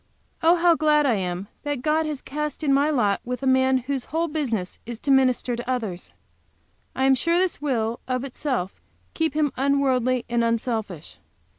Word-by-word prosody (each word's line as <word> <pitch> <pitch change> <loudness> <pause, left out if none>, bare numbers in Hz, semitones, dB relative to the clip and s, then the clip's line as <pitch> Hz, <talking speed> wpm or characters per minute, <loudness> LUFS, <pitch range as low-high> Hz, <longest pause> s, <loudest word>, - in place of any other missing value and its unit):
Oh, 330 +2 +5
how 345 0 +4
glad 300 -2 +3
I 260 - +3
am 180 +1 -3
that 290 -4 -3
God 310 +1 +1
has 295 -3 -5
cast 300 +2 -4
in 280 -2 +3
my 285 +2 +3
lot 215 -9 +1
with 250 +2 -5
a - - -1
man 260 0 +4
whose 260 0 -3
whole 330 +2 -1
business 245 - -3
is 235 0 -6
to 275 - -1
minister 255 -2 +3
to 240 +2 -6
others! 220 -9 -3 0.8
I 265 - +1
am 270 - +5
sure 335 +7 +1
this 365 -4 0
will, 235 -5 -1
of 255 0 -1
itself, 255 -7 -3 0.3
keep 320 -3 -1
him 300 -2 +1
unworldly 255 -3 +1
and 235 0 +1
unselfish. 225 - -3
265 Hz, 180 wpm, -24 LUFS, 235-295 Hz, 0.8 s, Oh